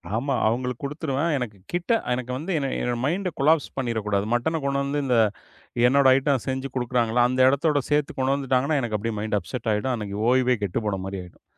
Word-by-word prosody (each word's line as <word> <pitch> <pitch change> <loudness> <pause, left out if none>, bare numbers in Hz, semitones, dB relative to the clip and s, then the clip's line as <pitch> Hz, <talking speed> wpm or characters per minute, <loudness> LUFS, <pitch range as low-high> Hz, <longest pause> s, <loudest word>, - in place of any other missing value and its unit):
ஆமா. 135 +4 -1
அவுங்களுக்கு 125 +2 -2
குடுத்துருவேன். 150 +2 -1
எனக்குக் 105 -6 -6
கிட்ட 175 +5 -1 0.2
எனக்கு 125 0 -3
வந்து 165 +7 -5
என்ன 140 -2 -1
என்னோட 120 -1 -1
மைண்ட 180 +5 0
கொலாப்ஸ் 155 +2 +3
பண்ணீற 120 -4 -1
கூடாது. 100 -1 +1
மட்டன 160 +7 0
கொண்டு 140 0 0
வந்து, 145 +1 -1
இந்த 125 -3 +2 0.7
என்னோட 140 +1 +4
ஐட்டம் 135 -3 +1
செஞ்சு 130 +1 -2
குடுக்கறாங்கள்ல, 120 -1 +1
அந்த 130 +1 -2
இடத்தோட 145 +1 +2
சேர்த்து 150 -1 +1
கொண்டாந்துட்டாங்கன்னா, 135 +2 +1
எனக்கு 110 -3 -1
அப்படியே 110 +1 -3
மைண்ட் 105 0 -1
அப்செட் 110 +7 -5
ஆயிடும். 125 +5 -1
அன்னைக்கு 105 -3 -5
ஓய்வே 125 0 +3
கெட்டுப்போன 100 +1 -1
மாரி 95 0 -5
ஆயிடும். 90 - -17
130 Hz, 180 wpm, -24 LUFS, 115-140 Hz, 0.7 s, என்னோட